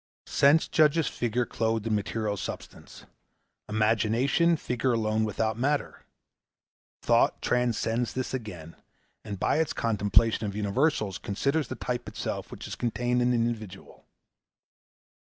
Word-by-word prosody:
Sense 145 +3 +4
judges 155 0 +3
figure 120 +1 -1
clothed 110 -2 -1
in 115 - 0
material 105 0 -1
substance, 100 - -8 0.6
Imagination 115 - +2
figure 125 -2 -1
alone 110 -1 +1
without 110 +1 -1
matter. 145 +3 -1 1.0
Thought - - +3
transcends 120 -1 0
this 130 0 -3
again, 90 -10 -6 0.5
and 100 -3 -6
by - - +1
its 160 - 0
contemplation 110 0 +2
of 100 - -5
universals 105 - 0
considers 140 +8 -1
the - - -5
type 120 -1 -4
itself - - -4
which - - -8
is - - -6
contained 125 +1 0
in 120 - +2
the 125 - +2
individual. 110 -5 -4
115 Hz, 125 wpm, -27 LUFS, 105-125 Hz, 1.0 s, Sense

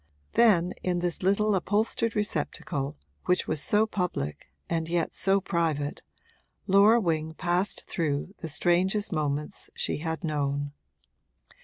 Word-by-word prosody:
Then, 185 -7 +4
in 180 -1 0
this 175 -1 -2
little 200 +3 +2
upholstered 215 +4 0
receptacle 145 - -2 0.3
which 180 - +2
was 155 -2 0
so 210 +6 +3
public 180 - -3 0.2
and 165 -1 -1
yet 170 -1 0
so 195 +1 +2
private, 160 -6 -1 0.6
Laura 205 +4 +6
Wing 160 -5 -1
passed 180 +3 -1
through 155 +2 -2
the 165 - -5
strangest 185 +6 +1
moments 150 -2 -2
she - - -1
had 160 +3 -4
known. 145 -2 -1
175 Hz, 125 wpm, -28 LUFS, 155-195 Hz, 0.6 s, Laura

